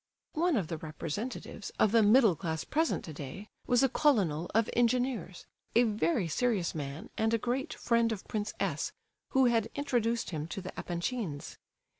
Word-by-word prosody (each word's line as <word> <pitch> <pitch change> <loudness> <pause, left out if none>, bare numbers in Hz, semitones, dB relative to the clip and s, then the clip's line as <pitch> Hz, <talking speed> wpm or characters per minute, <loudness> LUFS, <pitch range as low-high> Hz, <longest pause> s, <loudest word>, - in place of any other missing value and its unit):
One 340 +1 +2
of 185 -7 -1
the 165 -1 -4
representatives 165 - -5
of 215 - +4
the 230 0 +5
middle 215 -2 +6
class 160 -1 -3
present 320 +1 0
today 155 +6 -8 0.2
was 245 +1 +4
a - - +6
colonel 195 - +2
of 225 0 +4
engineers, 240 -6 0 0.3
a 240 - +7
very 205 -5 +1
serious 205 0 0
man 145 -1 -6
and 220 +1 +3
a - - +2
great 250 +4 -2
friend 235 -1 +2
of 210 -4 -5
Prince 210 -1 -3
S., 170 -7 -1 0.4
who 265 -1 +4
had 230 -2 +2
introduced 240 -5 0
him 155 -2 -3
to 185 - -5
the 185 0 -7
Epanchins. 175 - -4
215 Hz, 165 wpm, -31 LUFS, 170-245 Hz, 0.4 s, a